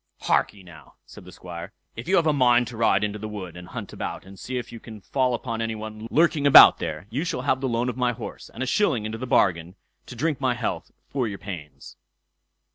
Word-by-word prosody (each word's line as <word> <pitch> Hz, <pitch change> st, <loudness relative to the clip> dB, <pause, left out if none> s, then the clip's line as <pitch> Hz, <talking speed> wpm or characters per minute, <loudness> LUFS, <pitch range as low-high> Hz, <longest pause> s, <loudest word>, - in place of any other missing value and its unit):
"Harkye, 100 Hz, -2 st, 0 dB
now", 85 Hz, -4 st, -15 dB
said -, -, -14 dB
the 90 Hz, -, -11 dB
Squire, 90 Hz, +1 st, -9 dB, 0.2 s
"if 115 Hz, -, -8 dB
you 190 Hz, -, +3 dB
have 170 Hz, -, +3 dB
a 155 Hz, -, +3 dB
mind 125 Hz, -3 st, +4 dB
to 120 Hz, 0 st, -8 dB
ride 110 Hz, -3 st, +2 dB
into 105 Hz, 0 st, -2 dB
the 110 Hz, -, -5 dB
wood, 95 Hz, -5 st, -7 dB
and 90 Hz, 0 st, -10 dB
hunt -, -, -7 dB
about -, -, -5 dB
and 95 Hz, 0 st, -13 dB
see 130 Hz, 0 st, -4 dB
if 120 Hz, -1 st, -5 dB
you 115 Hz, -, -9 dB
can 110 Hz, -2 st, -11 dB
fall 125 Hz, +5 st, 0 dB
upon 115 Hz, -1 st, -4 dB
any 115 Hz, 0 st, -2 dB
one 110 Hz, 0 st, -7 dB
lurking 155 Hz, -1 st, +3 dB
about 140 Hz, -, +9 dB
there, -, -, -4 dB
you 135 Hz, +7 st, -1 dB
shall 175 Hz, -8 st, -2 dB
have 130 Hz, -1 st, +1 dB
the 135 Hz, -, -1 dB
loan 120 Hz, +1 st, 0 dB
of 125 Hz, -, -3 dB
my 125 Hz, -1 st, +2 dB
horse, 115 Hz, -1 st, -8 dB
and 125 Hz, -, -5 dB
a -, -, -1 dB
shilling 135 Hz, -, +1 dB
into 110 Hz, +1 st, -5 dB
the 130 Hz, -, -5 dB
bargain, 90 Hz, -7 st, +2 dB, 0.3 s
to 125 Hz, -, -9 dB
drink 145 Hz, +3 st, -1 dB
my 130 Hz, -2 st, +1 dB
health, 120 Hz, -2 st, -3 dB, 0.2 s
for 130 Hz, -4 st, -1 dB
your 100 Hz, -2 st, -5 dB
pains." 75 Hz, -10 st, -9 dB
115 Hz, 240 wpm, -25 LUFS, 100-130 Hz, 0.3 s, about